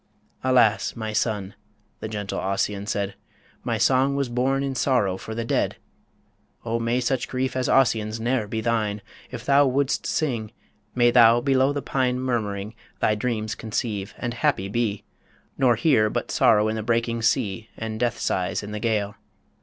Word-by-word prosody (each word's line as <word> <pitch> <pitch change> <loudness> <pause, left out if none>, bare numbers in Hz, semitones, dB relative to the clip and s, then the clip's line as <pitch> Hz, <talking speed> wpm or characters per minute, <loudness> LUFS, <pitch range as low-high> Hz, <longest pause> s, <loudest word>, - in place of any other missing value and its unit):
"Alas! 120 -5 +3
my 110 -1 -4
son," 105 -4 -1 0.5
the - - -5
gentle 105 -2 -4
Ossian 100 +1 -2
said, 100 -2 -2 0.5
"My 115 -2 -1
song 130 +4 +3
was 140 -2 -1
born 130 +3 0
in 135 -1 -2
sorrow 125 -8 +1
for 110 +3 -7
the 115 0 -3
dead!... - - 0 0.9
O 115 0 -1
may 115 +2 0
such 125 0 -1
grief 130 0 -2
as 130 -1 0
Ossian's 115 -4 +2
ne'er 120 -1 0
be 110 +1 -3
thine! 110 -3 -1 0.3
If 120 -3 -8
thou 140 0 +5
would'st 135 +1 0
sing, 115 -8 -2 0.4
may 120 -1 +4
thou 120 -1 +6
below 135 +1 +2
the 145 -1 -3
pine 125 -2 0
Murmuring, 110 -5 -2 0.3
thy 110 - +2
dreams 110 -1 -2
conceive, 105 -2 -4
and 120 -1 -3
happy 95 -4 0
be, 105 -1 -1 0.5
Nor 125 -3 +3
hear 115 -4 +3
but - - -3
sorrow 105 -1 +4
in 110 - -1
the 110 - -2
breaking 115 +1 0
sea 115 -2 0
And 110 -1 -5
death 120 -1 0
sighs 90 +2 -1
in 105 - -7
the 105 - -4
gale. 105 -3 -1
115 Hz, 170 wpm, -24 LUFS, 105-125 Hz, 0.9 s, thou